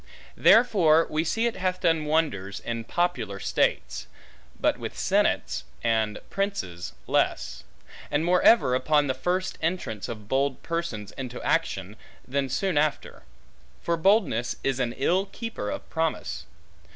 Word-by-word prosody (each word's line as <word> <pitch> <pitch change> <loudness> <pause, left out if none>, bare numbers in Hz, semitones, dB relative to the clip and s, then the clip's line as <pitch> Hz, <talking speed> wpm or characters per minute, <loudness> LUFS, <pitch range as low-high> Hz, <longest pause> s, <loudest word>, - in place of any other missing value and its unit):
Therefore 180 -9 +5
we 155 +1 +1
see 225 +8 0
it 235 - -1
hath 185 0 -1
done 165 -3 +2
wonders, 105 -12 0
in 115 -1 -4
popular 120 - -1
states; - - 0 0.5
but - - +1
with - - -6
senates, - - +1 0.2
and 110 -2 +1
princes 145 - -3
less; - - 0 0.5
and 150 +3 +1
more 180 +1 +3
ever 225 - +5
upon 145 +3 +3
the 130 - 0
first 180 +8 -2
entrance 160 - -2
of 110 -3 -7
bold 135 +2 0
persons 165 -12 -3
into 125 -2 -5
action, 95 +3 -1 0.3
than 135 +1 -1
soon 165 +4 +1
after; 150 -1 -1 0.6
for 170 - +1
boldness 170 - +2
is 135 -1 0
an 120 -2 0
ill 185 +7 +1
keeper 230 - -5
of - - -5
promise. 160 -1 -2
150 Hz, 140 wpm, -26 LUFS, 115-180 Hz, 0.6 s, Therefore